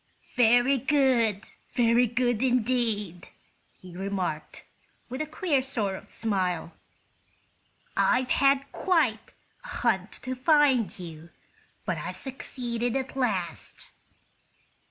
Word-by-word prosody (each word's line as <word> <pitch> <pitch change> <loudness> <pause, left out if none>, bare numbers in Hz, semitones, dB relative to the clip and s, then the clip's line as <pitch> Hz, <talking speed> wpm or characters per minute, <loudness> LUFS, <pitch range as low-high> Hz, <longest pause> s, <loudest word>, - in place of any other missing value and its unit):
"Very 245 +2 +4
good; 250 -7 +2 0.3
very 240 0 +4
good, 245 -1 0
indeed!" 230 -7 0 0.5
he 180 -1 -12
remarked, 185 -4 -4 0.5
with 255 +3 -4
a 310 - -2
queer 310 -3 0
sort 225 -7 -2
of - - -11
smile. 185 -6 -1 1.2
"I've 250 0 +2
had 275 0 +3
quite 310 -12 0 0.3
a - - -10
hunt - - 0
to 255 -1 -3
find 265 - +3
you, 165 -2 -9 0.6
but - - -1
I've - - -5
succeeded 245 -3 -4
at 265 -1 -3
last." 195 -11 -2
245 Hz, 105 wpm, -27 LUFS, 200-265 Hz, 1.2 s, Very